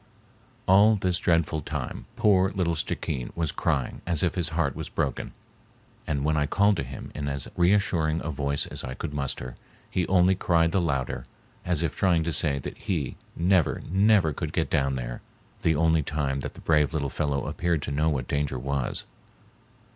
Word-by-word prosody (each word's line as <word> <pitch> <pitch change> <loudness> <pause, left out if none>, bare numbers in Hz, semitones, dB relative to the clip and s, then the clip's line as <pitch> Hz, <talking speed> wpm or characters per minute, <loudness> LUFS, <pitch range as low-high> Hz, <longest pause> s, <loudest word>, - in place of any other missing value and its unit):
All 105 +4 +6
this 90 -4 0
dreadful 80 -2 +1
time - - -5
poor 100 -5 +4
little 90 -4 +1
Stickeen 65 -5 -3
was 80 -3 0
crying 75 -7 -1
as 85 -4 0
if 90 - +2
his 85 -4 0
heart 80 -4 0
was - - -5
broken, 70 - -2 0.8
and 70 -2 -1
when 80 0 +2
I 75 -1 +1
called 100 +3 +3
to 70 - -1
him 65 +2 -8
in 70 - -4
as 70 -2 -2
reassuring 85 -4 +2
a 80 - -2
voice 70 0 -1
as - - -6
I 65 - -5
could 75 - -5
muster, 65 -3 -3 0.3
he 90 -2 0
only 95 0 +4
cried 85 -3 +2
the 95 0 +2
louder, 70 -7 -2 0.4
as 85 -2 0
if 80 - -1
trying 85 -4 +2
to 85 0 -2
say 75 -4 +2
that 70 - -7
he 85 - -2 0.2
never, 90 -1 +2
never 95 -4 +4
could - - -4
get - - 0
down 70 -2 +1
there—the 60 +5 -4
only 80 +1 +3
time 70 -2 -1
that - - -6
the - - -11
brave 75 -1 +2
little 70 -3 0
fellow 70 -1 -1
appeared 85 -4 -1
to - - -3
know 75 +3 +2
what 65 -5 -2
danger 70 -2 -1
was. 70 0 -2
80 Hz, 185 wpm, -26 LUFS, 70-90 Hz, 0.8 s, All